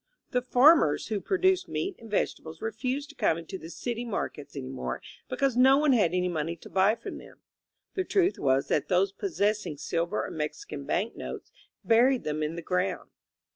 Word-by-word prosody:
The 250 - +1
farmers 250 - +5
who 210 -3 -1
produced 375 -1 +2
meat 385 0 -2
and 230 - -12
vegetables 160 -5 -2
refused 255 +6 -3
to 295 - -13
come 205 - +2
into 170 +3 -7
the 160 - -9
city 235 +9 -4
mar 230 -4 -2
kets 145 0 -12
any 130 -2 -5
more 130 - -4 0.3
because 275 -3 +1
no 265 +2 +6
one 295 -2 +4
had 205 -9 +3
any 180 0 +1
money 165 -1 -2
to 165 - -14
buy 195 +3 +4
from - - -7
them. - - -15 0.5
The 375 - 0
truth 370 0 +1
was 135 0 +2
that 150 - 0
those 185 +1 +2
possessing 210 - -1
sil 165 +3 -1
ver - - -1
or - - -7
Mexican 150 -2 -5
bank 215 +10 -1
notes - - -7 0.3
buried 245 +3 +4
them 155 0 -2
in 155 +2 -2
the 170 - -6
ground. 180 +2 -1
205 Hz, 195 wpm, -28 LUFS, 160-260 Hz, 0.5 s, no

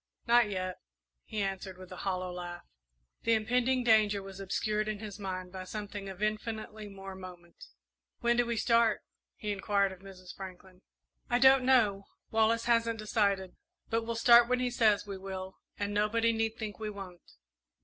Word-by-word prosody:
"Not 235 -2 +5
yet," 185 -2 -3 0.5
he 215 -2 -2
answered, 190 -1 -4
with 185 -1 -12
a - - -7
hollow 185 -2 -2
laugh. 175 -1 -7 0.6
The 230 - +2
impending 250 +3 +1
danger 215 -3 +4
was 195 0 -9
obscured, 210 +2 -1
in 215 -1 -2
his 210 -1 -8
mind, 185 -2 -5
by 185 0 -6
something 205 0 -6
of 190 +2 -6
infinitely 215 0 -3
more 195 -1 -8
moment. 180 -2 -11 0.5
"When 235 0 +2
do 245 - +4
we 235 -1 -1
start?" 230 -1 +3 0.3
he 210 - -4
inquired 200 0 +1
of 190 - -10
Mrs. 185 -1 -11
Franklin. 185 -1 -10 0.5
"I 240 - +3
don't 265 +1 +6
know 210 -7 +3 0.3
Wallace 225 +1 +2
hasn't 230 -1 +2
decided. 200 -3 0 0.4
But 230 0 +2
we'll 230 +1 -3
start 235 0 +7
when 250 0 +2
he 250 -1 0
says 215 -4 +3
we 200 -2 -6
will, 190 0 -6 0.2
and 205 0 -2
nobody 225 +3 +2
need 225 0 -1
think 215 -2 -5
we 215 -1 -3
won't!" 195 -4 -9
210 Hz, 170 wpm, -31 LUFS, 190-230 Hz, 0.6 s, start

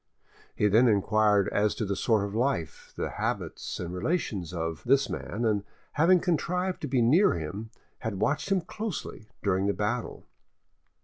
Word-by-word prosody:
He 105 - +2
then 115 +5 +5
inquired 105 -1 +3
as 105 0 +1
to 110 - -2
the 100 0 -1
sort 110 -1 +2
of 100 - -6
life, 110 - -2
the - - -3
habits - - -3
and 90 0 -4
relations 95 - -2
of, 80 -2 -3
this 135 +2 +3
man, 115 +3 -3
and 105 -3 +1 0.3
having 175 +4 +4
contrived 180 +2 -1
to 150 - -3
be 130 -3 +2
near 160 - +5
him, 85 +8 -5 0.3
had 110 -4 -4
watched 150 - 0
him 190 -2 +3
closely 170 - -6
during 95 -1 +1
the 100 - +2
battle. 110 +4 -3
110 Hz, 165 wpm, -28 LUFS, 100-145 Hz, 0.3 s, then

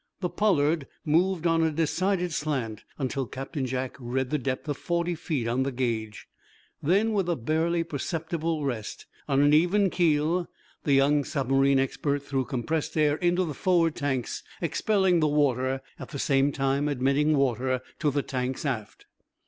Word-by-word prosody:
The 180 -2 -1
"Pollard" 160 -8 +1 0.2
moved 170 +3 +2
on 165 -1 +3
a 160 - +3
decided 175 +3 0
slant 130 -9 -3
until 135 -2 -2
Captain 135 +2 -4
Jack 130 0 -3
read 125 +1 -2
the 150 - +1
depth 130 +2 -3
of 145 -2 -2
forty 170 0 -1
feet 155 -7 -2
on 120 +3 +1
the 135 +1 0
gauge. 115 -4 -3 0.5
Then, 200 +8 +2
with 195 -4 0
a 170 - +2
barely 160 +6 0
perceptible 160 0 -3
rest. 115 -6 -4 0.2
On 140 0 +3
an 145 +1 +4
even 180 +5 +4
keel, 165 +1 +1 0.4
the 145 - +3
young 140 +2 +4
submarine 135 -1 +2
expert 140 +1 -1
threw 135 -2 -1
compressed 155 +5 -2
air 150 -1 +3
into 175 +1 +1
the 155 - -4
forward 170 +1 +2
tanks, 135 -5 -2 0.2
expelling 185 +1 +2
the 155 - +3
water, 135 -3 +1 0.2
at - - -8
the 145 - -6
same 140 0 +2
time 135 +1 0
admitting 145 +3 +2
water 130 -1 +1 0.2
to 150 - +2
the 145 0 0
tanks 130 +2 -3
aft. 115 -7 -4
145 Hz, 165 wpm, -27 LUFS, 135-165 Hz, 0.5 s, an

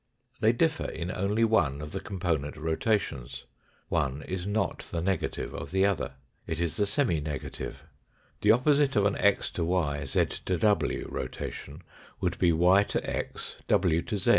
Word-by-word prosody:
They 110 -1 +5
differ 160 +6 +1
in 85 +3 -4
only 100 +4 +1
one 100 -12 +3
of 75 0 -6
the - - -3
component 85 -8 -2
rotations. 80 - -1 0.4
One 70 +2 -1
is 95 0 -4
not 105 +2 0
the 85 - -2
negative 95 0 -1
of - - -6
the 95 +1 +3
other. 100 -5 0 0.3
It 80 - -3
is 85 +1 -1
the 105 -1 +2
semi 105 - +1
negative. 75 -2 -5 0.6
The 105 - +3
opposite 140 +3 +3
of 105 -2 +4
an 100 - +2
x 100 -1 +3
to 85 - -2
y, 80 -4 0
z - - +2 0.2
to 90 - +1
w 105 +5 +1
rotation 70 +4 -6 0.4
would - - -1
be 85 - +4
y 90 +4 +5
to 105 - -2
x, - - -4
w 85 -2 +3
to 110 0 -3
z. 95 - 0
90 Hz, 170 wpm, -29 LUFS, 80-105 Hz, 0.6 s, They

